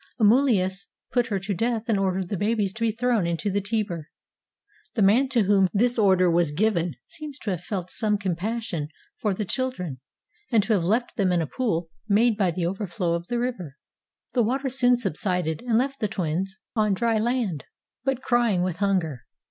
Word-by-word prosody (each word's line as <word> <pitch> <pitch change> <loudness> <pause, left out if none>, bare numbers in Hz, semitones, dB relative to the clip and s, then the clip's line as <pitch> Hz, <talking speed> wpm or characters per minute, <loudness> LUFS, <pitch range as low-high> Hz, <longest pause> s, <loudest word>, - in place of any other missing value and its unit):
Amulius 205 -6 +3 0.2
put 245 -2 +2
her 200 -3 -1
to 200 +1 -2
death 230 +4 -1
and 215 -4 +2
ordered 190 -2 0
th£ 200 - -2
babies 205 -2 0
to 230 - -10
be 230 -1 +2
thrown 230 -4 +1
into 170 +4 -1
the 200 +1 0
Tiber. 200 -7 -2 0.9
The 220 - +3
man 235 +8 +4
to 240 -4 +3
whom 195 -1 +4
this 240 +3 +2
order 190 -3 +4
was 170 -2 +2
given 175 -1 +1
seems 305 -4 -8
to 210 - -3
have 180 -3 -3
felt 185 -1 -4
some 210 -2 +1
compassion 190 -3 -2 0.3
for 210 -3 0
the 210 - -2
children 180 - -2 0.5
and 225 -4 +4
to 220 - +1
have 190 -5 +2
left 225 +8 0
them 195 -4 +2
in 175 - +2
a 165 - 0
pool 175 - -1 0.2
made 220 +3 +4
by 195 -3 +2
the 170 0 -2
over 195 +4 -2
flow 175 -1 -1
of 170 +1 -3
the 240 - -1
river. 215 - -3 0.6
The 245 - +3
water 265 +4 0
soon 250 -1 +3
subsided 180 -6 -1
and 225 -2 +3
left 275 +3 0
the 215 - +1
twins 190 0 -2 0.2
on 215 -3 +2
dry 225 +1 +1
land, 225 - -1 0.4
but 270 -1 -1
crying 235 -7 +2
with 180 -2 -2
hunger. 180 - -1
205 Hz, 195 wpm, -25 LUFS, 180-235 Hz, 0.9 s, man